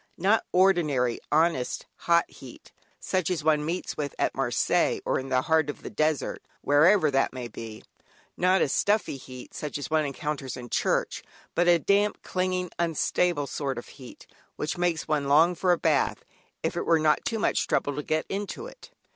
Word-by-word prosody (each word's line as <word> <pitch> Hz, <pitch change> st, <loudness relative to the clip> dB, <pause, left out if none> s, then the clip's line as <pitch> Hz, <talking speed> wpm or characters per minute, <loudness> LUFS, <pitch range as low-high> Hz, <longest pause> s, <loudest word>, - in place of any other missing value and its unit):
Not 200 Hz, +5 st, +2 dB
ordinary 155 Hz, -10 st, +2 dB
honest, 155 Hz, -4 st, +1 dB
hot, 170 Hz, 0 st, +2 dB
heat, -, -, -14 dB, 0.3 s
such 185 Hz, -4 st, -1 dB
as 170 Hz, -5 st, -2 dB
one 155 Hz, -1 st, +2 dB
meets 170 Hz, +4 st, -3 dB
with 145 Hz, -2 st, -4 dB
at -, -, 0 dB
Marseilles 130 Hz, -3 st, +1 dB
or -, -, +1 dB
in 135 Hz, 0 st, -7 dB
the 130 Hz, 0 st, +2 dB
heart 160 Hz, -2 st, +2 dB
of 145 Hz, -, -7 dB
the -, -, -7 dB
desert, 155 Hz, -2 st, -1 dB, 0.2 s
wherever 155 Hz, +3 st, +4 dB
that 135 Hz, -1 st, +1 dB
may 125 Hz, -2 st, -5 dB
be; 110 Hz, -1 st, -9 dB, 0.5 s
not 185 Hz, +1 st, +3 dB
even -, -, +3 dB
a -, -, -5 dB
stuffy 205 Hz, -8 st, +1 dB
heat, 130 Hz, -1 st, -11 dB
such 150 Hz, -2 st, -4 dB
as 145 Hz, -, -6 dB
one 155 Hz, -1 st, +3 dB
encounters 140 Hz, -1 st, -4 dB
in 120 Hz, -1 st, -9 dB
church, -, -, 0 dB, 0.3 s
but 175 Hz, +1 st, +2 dB
a 175 Hz, -1 st, +6 dB
damp, 200 Hz, +5 st, +1 dB
clinging, 185 Hz, -1 st, -2 dB
unstable 170 Hz, -1 st, +1 dB
sort 135 Hz, -2 st, -3 dB
of 120 Hz, -, -8 dB
heat, 130 Hz, -3 st, -13 dB, 0.3 s
which 150 Hz, -, -3 dB
makes 175 Hz, -2 st, -1 dB
one 145 Hz, -2 st, 0 dB
long 160 Hz, +5 st, +5 dB
for 180 Hz, +1 st, +1 dB
a 175 Hz, -, +3 dB
bath, -, -, 0 dB, 0.4 s
if -, -, -1 dB
it -, -, -3 dB
were 165 Hz, -, +5 dB
not 155 Hz, -1 st, +2 dB
too 225 Hz, -, -2 dB
much 220 Hz, -, 0 dB
trouble 145 Hz, -, 0 dB
to 150 Hz, -, -2 dB
get 155 Hz, +1 st, -1 dB
into 200 Hz, +1 st, -4 dB
it. -, -, -12 dB
155 Hz, 190 wpm, -27 LUFS, 140-175 Hz, 0.5 s, a